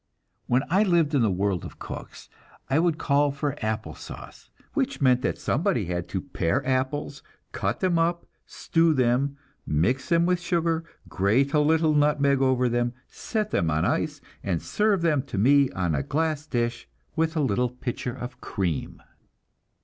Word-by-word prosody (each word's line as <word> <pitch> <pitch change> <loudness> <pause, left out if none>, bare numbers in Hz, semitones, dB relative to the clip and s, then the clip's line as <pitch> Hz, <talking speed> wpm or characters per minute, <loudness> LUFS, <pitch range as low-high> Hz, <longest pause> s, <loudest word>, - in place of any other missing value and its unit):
When 125 +2 +2
I 190 +3 +4
lived 170 -7 +2
in 140 - +3
the 110 - +3
world 95 -1 0
of - - -9
cooks, - - -9 0.4
I 140 - +4
would 165 -2 +2
call 145 -2 +2
for 140 0 -2
apple 110 0 -2
sauce; - - -11 0.2
which 275 -2 -1
meant 125 -2 +4
that - - -1
somebody 155 - 0
had 90 0 -3
to - - -2
pare 85 +9 -1
apples, 135 +2 -1 0.3
cut 100 +4 -2
them 180 -3 +2
up, 170 +1 0 0.2
stew 165 -1 +1
them, 130 +2 +1 0.3
mix 95 - 0
them 170 0 +4
with 180 0 +2
sugar, 170 -2 0 0.2
grate 115 +9 +1
a 150 - +4
little 155 +1 +3
nutmeg 145 -2 +3
over 130 -1 +3
them, 120 0 0
set 215 -2 -3
them 85 - +1
on 80 +1 +1
ice, - - -1 0.2
and 85 -4 -1
serve 210 -4 +1
them 155 -5 +3
to 140 - -7
me 140 +6 +5
on 85 -4 -1
a 70 - 0
glass 155 - -1
dish, 120 -3 -2 0.3
with 160 +1 0
a - - +2
little 125 -3 +1
pitcher 125 0 -5
of 125 -1 -8
cream. 90 -7 -3
140 Hz, 170 wpm, -26 LUFS, 120-160 Hz, 0.4 s, me